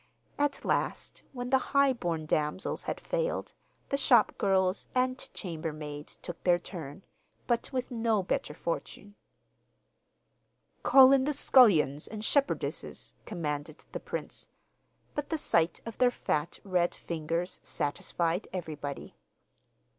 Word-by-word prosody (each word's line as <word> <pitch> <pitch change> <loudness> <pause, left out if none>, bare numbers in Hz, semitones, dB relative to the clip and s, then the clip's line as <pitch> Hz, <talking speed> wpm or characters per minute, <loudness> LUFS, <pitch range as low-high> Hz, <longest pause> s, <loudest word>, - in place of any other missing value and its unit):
At 290 -1 0
last, - - -1
when 245 -1 -5
the 265 - +5
high 280 +1 +3
born 170 -9 -2
damsels 155 +4 -1
had - - -4
failed, - - -2 0.4
the 275 - +1
shopgirls 195 -7 +3
and 255 0 +1 0.2
chambermaids 155 -4 -5
took 175 -2 -8
their 175 -1 +5
turn; 175 -1 -7 0.4
but 240 -1 0
with 255 -2 -2
no 225 -4 +1
better 150 -4 -2
fortune. 200 +5 -5 1.7
'Call 265 -1 +8
in 270 -1 +5
the 300 - +1
scullions 175 - +5
and 215 0 -6
shepherdesses,' 285 -1 -1
commanded 150 -5 -4
the - - -4
prince; - - -5 0.7
but 295 -1 -3
the 320 - 0
sight 170 - +1
of 230 -2 -7
their 250 - +6
fat, 155 -9 -2
red 180 -3 +1
fingers 170 +2 -3
satisfied 170 +5 -2
everybody. 150 -6 -5
190 Hz, 120 wpm, -30 LUFS, 160-255 Hz, 1.7 s, Call